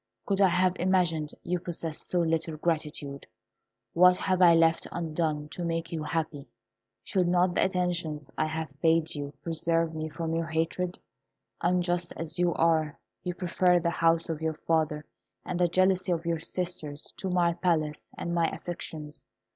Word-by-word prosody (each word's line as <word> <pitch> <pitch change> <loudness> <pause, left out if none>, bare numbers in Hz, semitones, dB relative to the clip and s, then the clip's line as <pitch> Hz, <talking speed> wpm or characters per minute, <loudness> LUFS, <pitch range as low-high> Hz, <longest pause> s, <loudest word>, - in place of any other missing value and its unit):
Could 200 -1 +1
I 195 - +7
have 180 0 +3
imagined 175 -4 +1
you 180 0 -1
possessed 165 -2 -6
so 180 - +2
little 160 -1 0
gratitude? 150 -3 -2 0.7
What 180 +1 +6
have 185 -1 0
I 170 -2 +8
left 165 0 +3
undone 155 -3 -2
to 175 - -5
make 165 -1 -2
you 165 -2 -3
happy? 155 -2 -3 0.6
Should 185 -4 +1
not 180 0 +3
the - - +3
attentions 175 -6 -1
I - - +1
have 160 -2 -4
paid 165 0 +3
you 145 -1 -5
preserve 165 0 0
me 155 0 -4
from 165 +1 -3
your 165 0 -1
hatred? 165 +3 -1 0.6
Unjust 175 0 +1
as 165 +1 -5
you 175 -1 +3
are, 160 -2 +2 0.3
you 180 -1 -3
prefer 180 0 +3
the 170 0 0
house 165 0 +2
of 160 -2 -3
your 160 -1 -1
father 155 -2 0 0.4
and 180 - -3
the 175 - +4
jealousy 185 +1 +2
of 170 -1 -1
your 170 -1 0
sisters 165 -4 -5
to 190 - -3
my 175 -1 +3
palace 160 -4 -1
and 170 - -3
my 170 -1 +3
affections. 155 -4 -6
165 Hz, 165 wpm, -28 LUFS, 160-180 Hz, 0.7 s, I